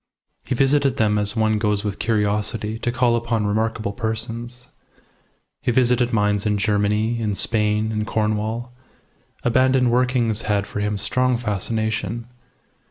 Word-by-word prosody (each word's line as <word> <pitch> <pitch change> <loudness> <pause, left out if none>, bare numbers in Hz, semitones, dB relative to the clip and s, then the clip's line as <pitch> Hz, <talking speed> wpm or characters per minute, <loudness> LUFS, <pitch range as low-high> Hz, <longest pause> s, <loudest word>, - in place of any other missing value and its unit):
He 130 - -2
visited 135 0 +2
them 105 -1 +2
as 105 +1 +1
one 110 -1 +2
goes 105 -1 0
with 100 -2 -3
curiosity 105 0 -1
to 120 - -1
call 120 -1 +2
upon 115 -2 -1
remarkable 110 0 -1
persons. 115 +2 -3 0.9
He - - -1
visited 125 0 +2
mines 105 -2 +1
in 105 -1 +1
Germany, 105 +2 +1
in 105 -2 -1
Spain, 105 +1 0
in 105 -1 -1
Cornwall. 110 +3 -2 0.7
Abandoned 130 0 +3
workings 120 -3 +1
had 100 -1 0
for 105 - -5
him 105 0 -1
strong 125 +5 +1
fascination. 110 0 -2
110 Hz, 135 wpm, -22 LUFS, 105-120 Hz, 0.9 s, Abandoned